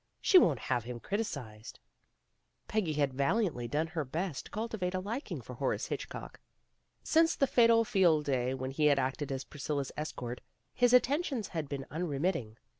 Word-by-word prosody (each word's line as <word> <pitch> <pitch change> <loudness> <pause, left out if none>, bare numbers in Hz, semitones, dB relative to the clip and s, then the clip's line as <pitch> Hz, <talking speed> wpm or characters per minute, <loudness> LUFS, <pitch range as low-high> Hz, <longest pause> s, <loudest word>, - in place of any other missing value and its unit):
She 375 - +7
won't 155 - +3
have 120 +1 -1
him 120 -1 -6
criticized. 125 - -5 0.3
' - - -48
' - - -48
Peggy 195 -8 0
had 145 -3 +1
valiantly 140 - 0
done 150 +6 0
her 160 -1 -3
best 160 +3 -3
to - - -13
culti 220 +1 -4
vate 180 0 -1
a - - 0
liking 225 +9 -4
for - - -9
Horace - - -1
Hitchcock. - - -6 0.6
Since 325 +1 +3
the 275 - +3
fatal 230 -3 +5
Field 175 -9 +3
Day 130 -2 0
when 130 0 -4
he 150 +2 +2
had 145 -1 +4
acted 135 +2 -1
as 135 0 -3
Priscilla's 145 -1 -3
escort, 125 -5 -5 0.3
his 245 -1 +3
attentions 260 - +2
had 160 -5 -4
been 135 -2 -4
unremitting. 150 - -2
155 Hz, 180 wpm, -32 LUFS, 135-210 Hz, 0.6 s, She